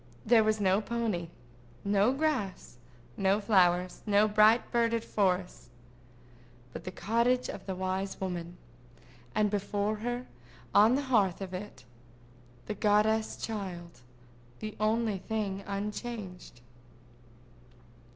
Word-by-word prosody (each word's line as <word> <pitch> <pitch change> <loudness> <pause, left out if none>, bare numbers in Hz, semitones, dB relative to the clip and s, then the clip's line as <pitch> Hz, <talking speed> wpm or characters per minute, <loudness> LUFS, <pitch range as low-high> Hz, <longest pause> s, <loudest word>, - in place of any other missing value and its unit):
There 225 -1 +5
was 215 0 +1
no 195 +1 +3
pony, 220 -6 -2 0.6
no 200 +3 +3
grass, 265 - -2 0.4
no 195 +1 +2
flowers, 185 -3 +2
no 210 +1 +4
bright 215 +2 +4
birded 230 -1 +1
forest—but 125 - -5
the 185 - -4
cottage 235 +6 +1
of - - -8
the 190 - -2
wise 190 +1 -3
woman—and 165 - -5
before 205 +1 -1
her, 245 +3 -3 0.5
on 215 +4 +6
the 285 - 0
hearth 210 -9 +2
of 190 -2 -6
it, 190 -5 -7 0.8
the - - -3
goddess 215 +2 +2
child, 180 - -6 0.6
the 215 -1 -6
only 215 -1 +1
thing 200 -2 -3
unchanged. 200 - -6
200 Hz, 105 wpm, -30 LUFS, 180-220 Hz, 0.8 s, on